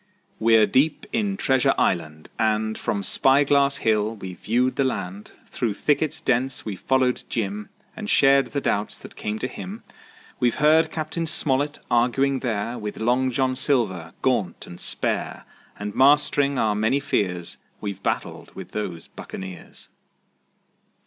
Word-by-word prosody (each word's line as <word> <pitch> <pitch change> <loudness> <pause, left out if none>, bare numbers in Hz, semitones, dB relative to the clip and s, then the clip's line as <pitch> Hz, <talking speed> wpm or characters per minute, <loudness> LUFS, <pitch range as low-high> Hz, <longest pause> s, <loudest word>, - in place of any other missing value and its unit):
We're 110 -1 +5
deep 140 +7 +1
in 205 -3 0
Treasure 130 -7 +2
Island, 80 -3 -1
and 110 -1 +1
From 100 -1 -2
Spy 135 +7 +4
Glass 140 0 +3
Hill 110 0 +2
we've 95 -3 -8
viewed 125 +4 +1
the 135 - +2
land; 100 -6 -4 0.2
Through 115 -5 -1
thickets 150 +5 0
dense 130 +1 0
we've 100 -4 -5
followed 130 -1 +1
Jim 105 -1 -3 0.3
And 215 -1 -6
shared 135 -5 +5
the 140 - -3
doubts 105 -4 -1
that - - -12
came 105 0 -3
to 125 - -2
him. 195 - -8 0.6
We've 120 -2 +2
heard 155 +2 +4
Cap. 155 -1 -5
Smollett 150 -3 -1
arguing 130 +3 +2
there 115 -1 -2
With 105 0 -5
Long 125 +3 +2
John 130 +1 0
Silver, 105 - 0
gaunt 105 -9 0
and 85 - -11
spare, - - -3 0.3
And 105 0 -5
mastering 140 0 +4
our 110 -3 +2
many 110 +6 +1
fears 90 -9 -2 0.2
We've 100 -2 -5
battled - - -3
with - - -9
those 90 -6 -5
buccaneers. 95 -1 -9
125 Hz, 145 wpm, -24 LUFS, 105-140 Hz, 0.6 s, We're